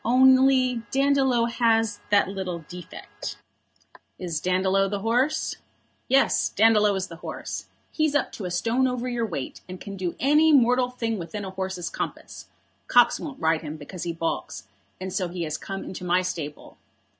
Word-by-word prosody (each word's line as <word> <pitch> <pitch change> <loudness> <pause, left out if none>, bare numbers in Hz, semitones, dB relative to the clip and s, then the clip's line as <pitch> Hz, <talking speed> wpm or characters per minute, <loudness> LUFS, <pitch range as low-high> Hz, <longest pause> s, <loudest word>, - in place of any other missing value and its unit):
Only 260 0 +5
Dandolo 270 -3 +3
has 225 -3 +1
that 205 -1 +4
little 185 -4 -5
defect." 180 -1 -8 0.8
"Is 170 -4 -3
Dandolo 190 +2 +2
the 200 0 -3
horse?" 245 +7 +1 0.5
"Yes; 270 +2 +3
Dandolo 210 -2 +4
is 190 -1 -1
the 165 - -10
horse. - - -6 0.2
He's 310 -2 0
up 290 - +1
to 200 - -7
a - - -2
stone 230 +9 +1
over 250 -1 -2
your 240 -2 -1
weight, 145 -9 -5
and 185 0 -7
can 200 +1 -7
do 180 -2 -3
any 300 +4 +5
mortal 250 -1 +4
thing 230 -4 -3
within 195 +4 -5
a 190 - -6
horse's 190 -2 -4
compass. - - -6 0.4
Cox 245 -1 +5
won't 285 -4 -7
ride 160 -1 +2
him 155 -1 -6
because 165 +4 -9
he 170 - -2
baulks, 165 0 -3 0.4
and 185 0 -5
so 185 -3 0
he 175 0 -4
has 155 -1 -3
come 195 0 -5
into 185 - -7
my 180 +1 +2
stable. 160 -5 -6
205 Hz, 165 wpm, -25 LUFS, 180-250 Hz, 0.8 s, Only